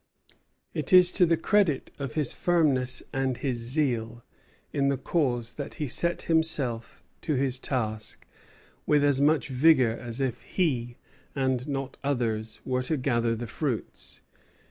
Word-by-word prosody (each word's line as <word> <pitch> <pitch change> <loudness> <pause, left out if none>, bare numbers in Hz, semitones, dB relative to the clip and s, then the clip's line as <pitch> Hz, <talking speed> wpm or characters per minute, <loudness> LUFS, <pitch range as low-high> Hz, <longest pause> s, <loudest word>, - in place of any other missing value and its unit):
It - - -2
is 180 -1 +8
to 180 -2 +4
the 165 0 +2
credit 185 -4 +1
of 140 -4 -5
his 150 -5 +1
firmness 145 -8 +1
and 135 -2 -1
his 130 -4 -2
zeal 120 -3 -1 0.5
in 140 -1 +1
the 140 -1 +1
cause 120 -6 -1
that 145 - -6
he 150 - -3
set 170 +7 +1
himself 150 -8 0 0.2
to 155 - -1
his 130 -1 +1
task 110 -6 -3 0.6
with 150 -1 +3
as 140 -1 +2
much 150 +1 +2
vigor 130 -2 +4
as 120 +1 -6
if 130 -3 -2
he, 125 -9 -1 0.4
and 130 -1 0
not 135 -1 -4
others, 115 -5 -2
were 125 0 0
to 140 +5 -1
gather 120 -3 0
the 120 +2 -5
fruits. 110 - -4
135 Hz, 145 wpm, -27 LUFS, 120-150 Hz, 0.6 s, is